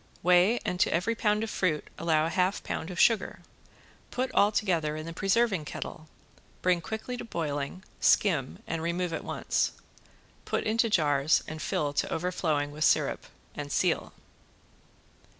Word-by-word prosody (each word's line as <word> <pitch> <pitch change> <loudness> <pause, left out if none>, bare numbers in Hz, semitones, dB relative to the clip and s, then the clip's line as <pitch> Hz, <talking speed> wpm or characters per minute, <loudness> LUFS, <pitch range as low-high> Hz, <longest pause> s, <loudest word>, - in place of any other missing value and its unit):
Weigh, 180 +6 +5
and 180 - -2
to - - +3
every 185 +7 +1
pound 215 -2 +1
of 225 - -4
fruit 165 -5 0
allow 160 -1 +2
a 165 - -2
half 185 +2 +1
pound 160 - -4
of 180 -1 -6
sugar, 225 -3 +3 0.7
put 255 +1 -2
all 205 +1 +4
together 170 -8 0
in 155 0 -5
the 165 - -6
preserving 195 -1 +1
kettle, 155 +2 -7 0.6
bring 180 -1 +3
quickly 220 +6 -5
to - - -6
boiling, 155 -3 -3 0.2
skim, 155 -11 +2
and 165 -1 -3
remove 170 +1 -1
at - - -3
once. - - -1 0.7
Put - - -1
into 225 +1 +2
jars 150 -5 +3
and 155 0 -6
fill 145 0 -1
to - - -1
overflowing 160 -4 -1
with 150 +1 -3
sirup, - - +2 0.3
and - - -6
seal. - - +1
175 Hz, 155 wpm, -28 LUFS, 155-205 Hz, 0.7 s, Weigh